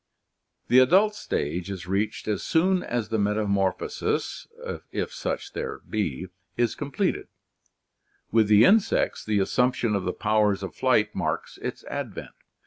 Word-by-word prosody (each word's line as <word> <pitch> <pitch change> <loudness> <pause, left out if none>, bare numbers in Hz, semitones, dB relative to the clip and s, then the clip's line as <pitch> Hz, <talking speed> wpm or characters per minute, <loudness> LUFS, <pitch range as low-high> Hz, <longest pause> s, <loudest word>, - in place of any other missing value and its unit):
The 125 - +6
adult 190 +11 +5
stage 85 - -3
is 95 -3 -6
reached 100 +4 -2
as 105 - -1
soon 180 +3 +2
as 115 -4 -3
the 110 - 0
metamorphosis, 100 - -1 0.4
if - - -3
such 435 -4 -4
there 465 -2 -4
be, 95 - -2 0.3
is 120 -2 +2
completed 145 -2 -2 0.5
— - - -45
with 110 -1 +4
the 105 +2 +7
insects 210 +4 +3
the 110 -1 0
assumption 120 +3 +1
of 100 - -1
the 90 - -1
powers 105 -2 +1
of 95 - -6
Sight 110 -5 +2
marks - - -3
its - - -5
advent. - - -6
110 Hz, 140 wpm, -26 LUFS, 100-135 Hz, 0.5 s, the